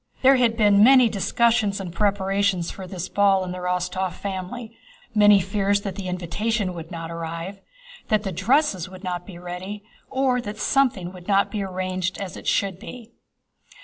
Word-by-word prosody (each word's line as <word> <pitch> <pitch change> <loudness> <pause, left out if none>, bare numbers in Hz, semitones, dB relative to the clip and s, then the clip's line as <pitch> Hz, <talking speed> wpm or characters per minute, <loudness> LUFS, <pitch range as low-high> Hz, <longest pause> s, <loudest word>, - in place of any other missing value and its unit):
There 265 +1 +7
had 235 -2 +2
been 205 -2 +5
many 255 -1 +7
discussions 215 +1 +1
and 180 -3 -6
preparations 195 -3 +1
for 190 -1 -9
this 180 -1 -5
ball 195 -2 +3
in 180 - -5
the 180 - -5
Rostóv 180 +1 -2
family, 200 +4 -6 0.4
many 210 -2 +6
fears 200 +2 0
that 195 -2 -4
the 190 0 -6
invitation 185 +3 -2
would 165 -1 -8
not 165 -1 -6
arrive, 170 +4 -6 0.5
that 215 -1 +1
the 195 - -3
dresses 190 - +1
would 185 0 -12
not 180 -1 -4
be 185 -4 -9
ready, 180 +4 -7 0.3
or 260 -2 +1
that 210 -2 -6
something 220 -8 +1
would 180 -1 -12
not 200 -1 +2
be 210 - -2
arranged 185 -1 -3
as 195 -3 -5
it - - -9
should 195 -2 0
be. 235 +1 -10
195 Hz, 175 wpm, -23 LUFS, 180-210 Hz, 0.5 s, There